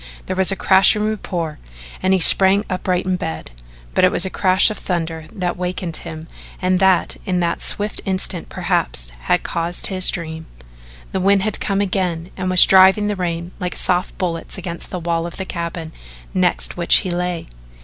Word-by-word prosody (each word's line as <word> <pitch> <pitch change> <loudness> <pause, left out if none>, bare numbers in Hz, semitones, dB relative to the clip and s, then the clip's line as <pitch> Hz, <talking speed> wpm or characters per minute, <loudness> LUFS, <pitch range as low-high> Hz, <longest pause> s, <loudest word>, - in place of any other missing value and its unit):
There 185 - -3
was 190 +1 +4
a - - -1
crashing 195 +3 +4
report 180 -7 -3 0.4
and 185 - +1
he 190 - +3
sprang 195 +3 +6
upright 185 0 -1
in 185 -1 0
bed 80 - -6 0.4
but - - +2
it 185 - +5
was 180 - 0
a 190 - -4
crash 190 +3 +3
of 210 - -6
thunder 165 -3 -3
that 180 -2 -3
wakened 180 -2 -4
him 160 -1 -9 0.3
and 185 0 +1
that 190 -2 +2
in 180 -1 -1
that 170 -1 -1
swift 210 +1 -2
instant 185 -2 -1
perhaps - - -2
had - - +1
caused 170 +1 -2
his 185 -1 +3
dream. 160 -2 -5 0.6
The 190 - -2
wind 195 +1 +3
had 215 -1 -2
come 195 0 -1
again 185 -3 -2
and 185 -1 -3
was 185 -1 +8
driving 190 +2 +5
the 210 - -1
rain 170 -1 -4
like 180 -2 -4
soft 180 0 0
bullets 170 -1 -4
against 170 -2 -7
the 185 - -5
wall 170 -1 -2
of 170 - -10
the 190 - -4
cabin 170 -2 -5 0.4
next 185 -2 0
which 170 -1 +5
he 185 - -2
lay. 175 -1 -3
180 Hz, 185 wpm, -19 LUFS, 170-190 Hz, 0.6 s, was